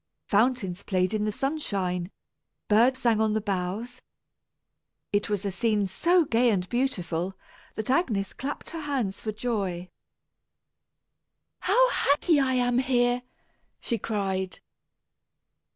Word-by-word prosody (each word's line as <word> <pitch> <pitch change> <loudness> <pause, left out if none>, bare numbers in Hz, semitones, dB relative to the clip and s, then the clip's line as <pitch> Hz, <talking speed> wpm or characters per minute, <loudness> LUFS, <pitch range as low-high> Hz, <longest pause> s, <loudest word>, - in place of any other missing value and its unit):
Fountains 205 -4 +1
played 185 0 0
in 215 -1 0
the 215 - 0
sunshine, 195 - -2 0.6
birds 235 +5 +4
sang 230 -4 +2
on 215 -1 +2
the 220 - +1
boughs. 205 +5 -3 1.1
It 205 0 +1
was 205 -1 -1
a 200 - 0
scene 210 +2 +1
so 335 - +3
gay 240 -1 +3
and 185 -4 0
beautiful, 190 -8 -1 0.4
that 220 +3 -2
Agnes 220 - +1
clapped 280 +2 -5
her 330 - -5
hands 260 -10 -2
for 215 - -2
joy. 200 -6 -3 1.7
"How - - +4
happy 290 - +3
I 265 -1 +2
am 245 0 +2
here!" 245 -1 +2 0.6
she 235 -3 -2
cried. 190 -4 -2
220 Hz, 120 wpm, -27 LUFS, 195-255 Hz, 1.7 s, birds